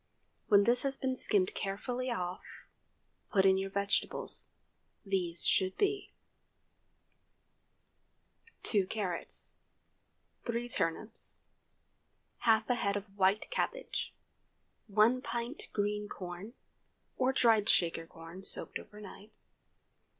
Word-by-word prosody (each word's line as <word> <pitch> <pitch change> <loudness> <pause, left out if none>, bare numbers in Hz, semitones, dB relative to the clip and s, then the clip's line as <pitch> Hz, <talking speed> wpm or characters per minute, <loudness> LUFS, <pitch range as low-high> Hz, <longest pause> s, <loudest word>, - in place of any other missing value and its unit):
When 200 -2 +7
this 240 +3 +4
has 275 -1 +1
been 260 -1 -1
skimmed 200 -7 +2
carefully 245 +6 -2
off, 180 -6 -4 0.7
put 195 -2 +4
in 190 0 +6
your 195 0 -2
vegetables. 200 +1 0 0.6
These 180 -4 0
should 190 -1 +3
be:— 405 0 0 2.5
2 200 -4 +2
carrots. 190 -5 -3 0.9
3 235 +1 -2
turnips. 215 +3 -2 1.0
Half 220 -1 +4
a 250 - +3
head 200 0 +1
of 200 0 -8
white 200 - +2
cabbage. - - -2 0.7
1 220 +5 +4
pt. 240 +4 -3
green 210 0 -1
corn—or 200 +7 -5
dried 225 -5 +4
Shaker 165 -1 +3
corn, 165 +3 -11
soaked - - -3
over 210 - -12
night. 210 +1 -11
205 Hz, 100 wpm, -33 LUFS, 190-235 Hz, 2.5 s, When